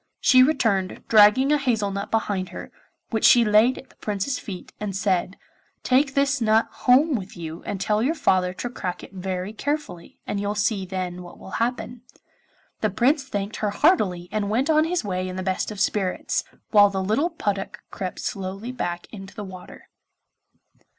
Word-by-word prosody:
She 255 -1 +6
returned, 225 -10 +1
dragging 220 +6 +6
a 300 - +3
hazel 225 -7 0
nut 200 0 -4
behind 205 -4 -1
her, - - -9 0.4
which 220 -2 -1
she 240 -1 +7
laid 215 +4 +4
at 265 - -12
the - - -25
Prince's 210 +5 -2
feet 185 -4 -8
and 205 -3 -4
said, 190 -1 0 0.5
'Take 270 +2 +2
this 280 -1 +2
nut 220 0 +3
home 275 +5 +3
with 200 -6 -4
you 165 -1 -7
and 200 - -3
tell 210 +2 +1
your 290 +8 +1
father 185 - +2
to 185 +7 -5
crack 180 -7 -5
it - - -12
very 185 +1 -4
carefully, 275 - -4
and 200 - -3
you'll 205 +1 -2
see 205 -2 0
then 180 -1 -4
what 175 -1 -12
will 190 - -12
happen.' 240 0 -2 0.8
The 215 - +1
Prince 270 - +2
thanked 205 -5 -4
her 210 - -1
heartily 200 - +2
and 210 -2 -1
went 255 +9 +1
on 310 0 +4
his 355 -2 -1
way 185 -2 -2
in 185 - -6
the 185 - -4
best 185 0 -1
of 210 -2 -7
spirits, 195 -3 0 0.3
while 205 -2 +7
the 190 -1 -2
little 225 - +1
puddock 205 - -3
crept 185 -2 -5
slowly 195 +4 -4
back 175 -8 -4
into 195 -2 -10
the 210 - -6
water. 185 -2 -11
205 Hz, 185 wpm, -24 LUFS, 190-250 Hz, 0.8 s, she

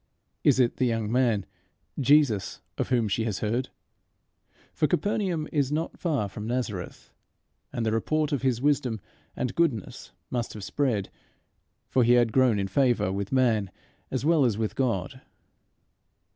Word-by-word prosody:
Is 140 -3 +4
it 120 -2 +2
the 130 - +2
young 115 -2 -1
man, 120 -6 +2 0.5
Jesus, 140 -7 +3 0.2
of - - -2
whom 120 -4 +2
she 110 +3 0
has 105 -4 -3
heard? 120 +4 -1 1.0
for 155 - +1
Capernaum 175 -1 0
is 145 -3 +1
not 160 +2 -2
far 145 - 0
from 105 +2 -7
Nazareth, 115 -7 -4 0.6
and 115 - -2
the 110 - +1
report 150 +7 0
of 140 - 0
his 130 -2 0
wisdom 130 -6 +1 0.4
and 125 - -2
goodness 140 - -1 0.2
must 120 -2 -2
have 105 - -7
spread, 115 -6 -1 0.8
for 130 - +2
he 120 +1 +5
had 120 -3 +3
grown 130 -5 +4
in 100 -1 -1
favour 120 -1 +2
with 100 +1 -3
man 115 -7 +2 0.4
as 130 +1 -2
well 160 -2 +4
as 115 -5 +1
with 110 -1 -2
God. 125 -1 -1
125 Hz, 155 wpm, -27 LUFS, 110-140 Hz, 1.0 s, he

